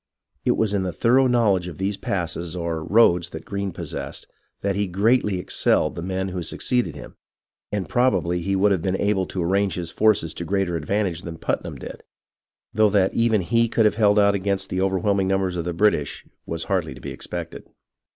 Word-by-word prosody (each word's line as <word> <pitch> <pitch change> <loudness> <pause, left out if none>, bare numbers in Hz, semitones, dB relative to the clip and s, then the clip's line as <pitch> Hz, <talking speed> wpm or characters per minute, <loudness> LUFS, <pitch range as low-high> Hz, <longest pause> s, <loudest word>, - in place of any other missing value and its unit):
It - - +2
was 110 -2 +1
in 100 - +1
the 95 -1 -2
thorough 130 +7 +3
knowledge 105 -7 +2
of 85 -4 -8
these 100 +2 -1
passes 85 -3 -3
or 85 -2 -3
roads 90 -4 +4
that 80 - -8
Greene 100 -1 -3
possessed, - - -6 0.4
that 100 -1 0
he 100 0 0
greatly, 105 +2 +2
excelled 85 -3 +1
the 85 - -6
men 95 +2 -2
who 90 -1 -4
succeeded 90 - -1
him, - - -11 0.5
and 100 -3 -2
probably 95 -8 +1
he 95 +3 -1
would 100 +2 +3
have 95 -4 +1
been 95 +2 -1
able 100 -2 +1
to 90 - -3
arrange 95 +1 +1
his 85 -2 -5
forces 105 -7 +2
to - - -5
greater 95 0 -1
advantage 90 +2 -1
than 85 -2 -7
Putnam - - -3
did, - - -9 0.7
though 110 -1 +4
that 95 -2 +2
even 115 -3 +2
he 115 +5 +2
could 115 - +2
have 105 - +2
held 105 -2 +4
out 100 -1 +5
against 100 -1 -1
the 90 - 0
overwhelming 95 0 +1
numbers 95 -1 0
of 85 -2 -3
the 90 - -1
British 85 -5 +1 0.2
was 80 0 -2
hardly 85 -2 -1
to - - -12
be - - -7
expected. - - -7
95 Hz, 200 wpm, -23 LUFS, 85-105 Hz, 0.7 s, out